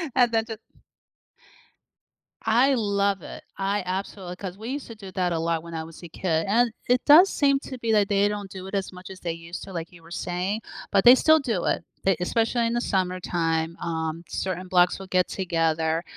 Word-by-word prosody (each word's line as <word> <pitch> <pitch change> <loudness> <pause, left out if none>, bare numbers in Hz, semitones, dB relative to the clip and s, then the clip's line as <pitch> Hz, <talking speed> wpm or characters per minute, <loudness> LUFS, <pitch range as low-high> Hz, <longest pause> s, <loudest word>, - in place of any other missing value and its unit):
and 245 -2 +4
then, 225 -1 +1
ju 225 -2 -6 1.9
I 245 +5 +4
love 200 -4 +1
it, - - -9
I 195 +1 -1
absolu 185 -1 -4
'cause 190 -1 -6
we 220 +3 -7
used 280 +1 -4
to 230 - -9
do 195 -3 -10
that 180 -1 0
a 165 - -1
lot 165 0 -1
when 170 0 -9
I 160 - -3
was 165 +2 -12
a - - -7
kid, 165 -2 -1
and 230 +3 +3 0.2
it 250 +1 +3
does 340 +7 +8
seem 275 -1 +2
to 260 - -7
be 230 -2 -1
that 210 -2 +4
they 200 0 +3
don't 205 -2 -4
do 190 0 -8
it 195 - -10
as 195 -1 -2
much 180 +1 -11
as 190 - -10
they 170 -2 -3
used 165 +1 -8
to 190 - -9
like 165 -1 -5
you 175 -2 -16
were 165 - -16
saying, 180 +5 -2 0.3
but 195 -2 +4
they 245 +2 +10
still 315 +3 +5
do 230 - -2
it, - - 0 0.2
e 195 - +5
especially 230 +4 +1
in 230 - -1
the 240 - 0
summertime, 175 -4 -1
um, 165 0 -3
certain 185 -1 -3
blocks 180 -1 +3
will 190 - -9
get 185 -1 +2
together, 165 -3 0
190 Hz, 215 wpm, -25 LUFS, 170-225 Hz, 1.9 s, they